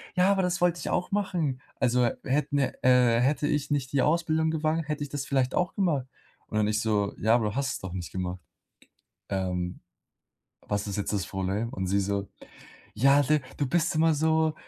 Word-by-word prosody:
„Ja, 185 +2 +4
aber 195 - +2
das 180 0 -1
wollte 175 -1 +2
ich - - -4
auch 180 - -1
machen. 175 -10 -1 0.2
Also 125 -1 +3 0.2
hätten, 145 +2 0
äh 135 - +1 0.5
hätte 145 +3 +1
ich 150 -2 -1
nicht 135 -3 -1
die 140 - +2
Ausbildung 160 +1 +2
gewagt, 155 0 -1
hätte 150 -1 -2
ich 145 - -6
das 140 -1 -4
vielleicht 135 -2 0
auch 180 -1 0
gemacht." 155 -10 0 0.4
Und 110 - -3
dann 105 -1 +2
ich 105 +1 0
so: 105 -2 0
„Ja, 110 +3 +4
aber 120 -3 +1
du 105 - -7
hast 135 -1 -1
es - - -5
doch 95 - -7
nicht 90 -3 -5
gemacht. 90 -1 -3 0.9
Ähm, 90 -2 -2 0.9
was 105 0 -1
ist 100 - -3
jetzt 100 - -2
das 100 -3 -1
Problem?" 95 +4 -2
Und 95 -1 -3
sie 100 +2 +2
so: 100 0 -2 0.7
„Ja, 140 +5 +5
du 150 +2 +2 0.2
du 145 - 0
bist 170 +3 +1
immer 160 0 +4
so 160 +1 +2
140 Hz, 200 wpm, -27 LUFS, 105-160 Hz, 0.9 s, Ja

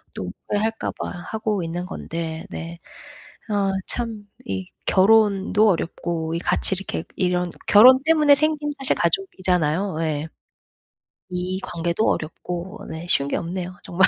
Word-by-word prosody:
또 - - -4 0.2
후회할까 220 +2 -1
봐 - - -4 0.2
하고 210 -4 -1
있는 175 +2 -3
건데. 165 -1 -5
네. 170 0 -7 0.7
어 200 -2 +1 0.2
참 225 -4 -4 0.2
이 190 -4 -3 0.2
결혼도 205 +1 +4
어렵고 165 -1 -2
이 - - 0
같이 190 - +1
이렇게 195 -4 -4
이런 180 -1 +1 0.2
결혼 255 +5 +8
때문에 305 -3 +6
생긴 305 0 0
사실 270 0 +1
가족이잖아요. 185 - 0
예. 155 0 -2 1.0
이 180 +1 -2
관계도 170 +5 -1
어렵고. 175 +6 -4
네 160 +2 -6
쉬운 140 -4 +3
게 - - -1
없네요 180 +1 -4
정말. 185 +2 +4
185 Hz, 265 characters per minute, -23 LUFS, 170-215 Hz, 1.0 s, 결혼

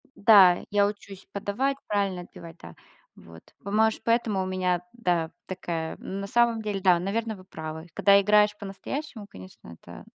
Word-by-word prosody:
Да, 195 -4 +6
я 205 0 +3
учусь 200 -2 -7
подавать, 230 +8 -2
правильно 200 -3 -1
отбивать. 170 -1 -12
Да, 85 0 -12 0.4
вот. 85 0 -15 0.2
Па 200 - -6
может, 220 +1 +1
поэтому 230 -4 +1
у - - -4
меня, 185 -1 -1
да, 175 -8 -1 0.2
такая. 165 -3 -5
Ну, 195 - -6
на 200 - -5
самом 235 +1 +2
деле, 210 -2 -3
да, 180 -2 +4
наверно, 220 +4 -3
вы 185 - -14
правы. 160 -2 -8
Когда 200 +3 +5
играешь 210 +1 +3
по-настоящему, 215 +4 -7
конечно, 95 - -14
это - - -12
200 Hz, 165 wpm, -26 LUFS, 180-210 Hz, 0.4 s, Да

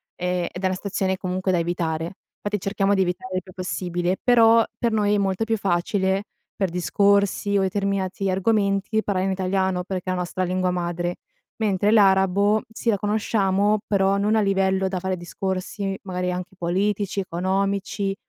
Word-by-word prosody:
e 180 -1 -1
ed 180 - -8
è - - +2
una 185 0 +1
situazione, 190 -1 -2
comunque, 185 0 -1
da 180 - +2
evitare. 165 -2 -1 0.4
Infatti, 205 0 -2
cerchiamo 195 +1 0
di 190 - +2
evitare 185 +1 -2
il 185 - -1
più 185 - -14
possibile, 180 0 -2
però, 230 -2 +5
per 235 -2 +1
noi, 210 -1 +2
è - - +2
molto 195 +1 0
più 225 0 0
facile, 190 +1 0 0.3
per 195 -2 0
discorsi, 200 +3 +2
o 195 - +2
determinati 195 0 -1
argomenti, 200 +2 +1
parlare 190 -2 0
in - - 0
italiano, 190 -1 0
perché 185 0 -4
è - - +1
la 180 - -2
nostra 180 +1 -2
lingua 185 0 0
madre, 175 0 -2 0.4
mentre 205 -2 +1
l'arabo, 200 0 +4
sì, 225 +1 -2
la 210 - +3
conosciamo, 205 0 +1
però 195 -1 +2
non 210 +2 +2
a - - +3
livello 190 -1 +1
da 190 -1 -2
fare 190 +1 -2
discorsi, 190 +2 -3
magari, 180 -1 -2
anche 180 +1 -5
politici, 195 +3 -1
economici, 195 +2 -1
190 Hz, 170 wpm, -23 LUFS, 185-200 Hz, 0.4 s, però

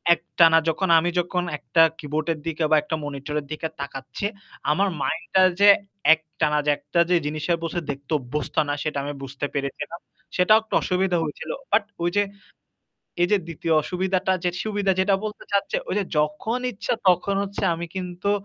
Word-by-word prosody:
একটানা 165 -1 +4
যখন 185 +3 -1
আমি 175 +2 0
যখন 175 0 -1
একটা 165 - +2 0.2
কিবোর্ডের 155 +1 -2
দিকে 160 0 -2
বা - - +7
একটা 160 - -2
মনিটরের 145 +1 -4
দিকে 155 +1 -3
তাকাচ্ছে 135 +4 -5 0.5
আমার 195 +6 +2
মাইন্ডটা 205 -3 +1 0.2
যে 205 0 +8 0.4
একটানা 155 -1 -1
যে 150 - +4
একটা 150 +4 -2
যে 180 - +4
জিনিসের 155 +3 -1
বসে 165 +1 -2
দেখতে 140 +1 -6
অভ্যস্ত 130 +2 -4
না - - +1
সেটা 155 -2 -2
আমি 145 +1 -4
বুঝতে 135 +1 -4
পেরেছিলাম। 140 +4 -4 0.4
সেটাও 215 +5 +5
একটু 220 - -12
অসুবিধা 185 -1 +1
হয়েছিল। 150 - -5 0.2
বাট 215 - +4 0.2
ওই 175 - +2
যে 205 - +5 1.0
এই - - +5
যে - - +6
২য় 165 0 -1
অসুবিধাটা 185 +2 0
যে 180 - +2
সুবিধা 205 -3 +1
যেটা 195 +1 +3
বলতে 210 0 -6
চাচ্ছে, 200 - +1
ওই - - -1
যে 200 - 0
যখন 150 +11 0
ইচ্ছা 215 +4 -2
তখন 185 +2 +3
হচ্ছে 200 0 -5
আমি 170 +1 -5
কিন্তু 180 +1 -3
170 Hz, 170 wpm, -24 LUFS, 150-190 Hz, 1.0 s, যে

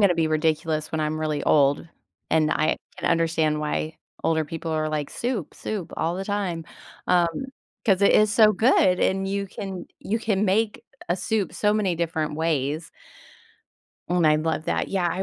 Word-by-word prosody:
gonna 200 -4 +5
be 165 -1 +1
ridiculous 155 0 0
when 160 - -1
I'm 155 0 -1
really 155 -2 -1
old, 140 +1 +3 0.4
and 155 -1 +3
I 155 - +1 0.2
can - - -1
understand 160 -2 +1
why 155 +1 -2 0.3
older 160 -1 +1
people 165 +2 -5
are 155 -1 0
like, 150 -2 -2
"Soup, 235 - -3
soup 205 -6 -5
all 165 +2 0
the 190 +2 -4
time," 195 -5 -2 0.4
um, 175 +4 +2 0.4
'cause 195 -2 +3
it 200 - +6
is 215 0 +5
so 215 0 +6
good, 190 -4 +3
and 195 0 +1
you 200 +1 -2
can 190 -2 -7
you 220 +3 -1
can 210 -3 0
make 215 +2 0 0.2
a 175 - +1
soup 200 +1 -1
so 210 0 +2
many 205 -4 +1
different 160 -2 -1
ways 160 0 -1 1.2
and 175 -2 +2
I 150 0 +5
love 160 0 -1
that. - - -1
Yeah, 185 -3 0
I 185 +3 -2
165 Hz, 175 wpm, -24 LUFS, 155-195 Hz, 1.2 s, it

